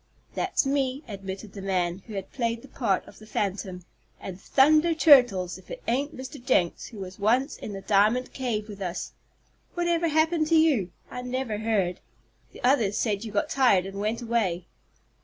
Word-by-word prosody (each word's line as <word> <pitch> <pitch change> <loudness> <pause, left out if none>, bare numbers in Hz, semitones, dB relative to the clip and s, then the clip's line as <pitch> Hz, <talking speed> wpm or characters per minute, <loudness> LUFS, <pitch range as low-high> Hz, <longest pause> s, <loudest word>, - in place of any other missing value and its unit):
"That's - - 0
me," 270 0 0
admitted 195 0 -7
the 200 - -7
man 180 -2 -1
who 215 - -7
had 195 - -6
played 230 -3 -2
the - - -11
part 225 -8 -1
of - - -14
the 215 - -14
phantom, 190 -4 -3 0.3
"and 190 0 -8
thunder 310 +4 +4
turtles! 245 - +5
if 185 - -20
it - - -8
ain't 280 +6 -1
Mr. 260 0 -8
Jenks 185 -10 +1
who 225 - -11
was 190 -1 -8
once 245 +8 +2
in 210 - -7
the 195 - -6
diamond 215 +5 +2
cave 230 -5 -2
with 205 -2 -9
us. 180 -1 -4 0.6
Whatever 345 -1 +1
happened 315 0 +2
to 330 - +3
you? 285 - +3 0.2
I 250 - -5
never 250 -4 -3
heard. 205 -5 0 0.5
The - - -14
others 235 -6 +3
said 210 -2 0
you 220 - -6
got 205 0 0
tired 240 -9 +4
and 195 +1 -6
went 220 +4 -2
away." 205 -7 0
225 Hz, 180 wpm, -26 LUFS, 195-265 Hz, 0.6 s, turtles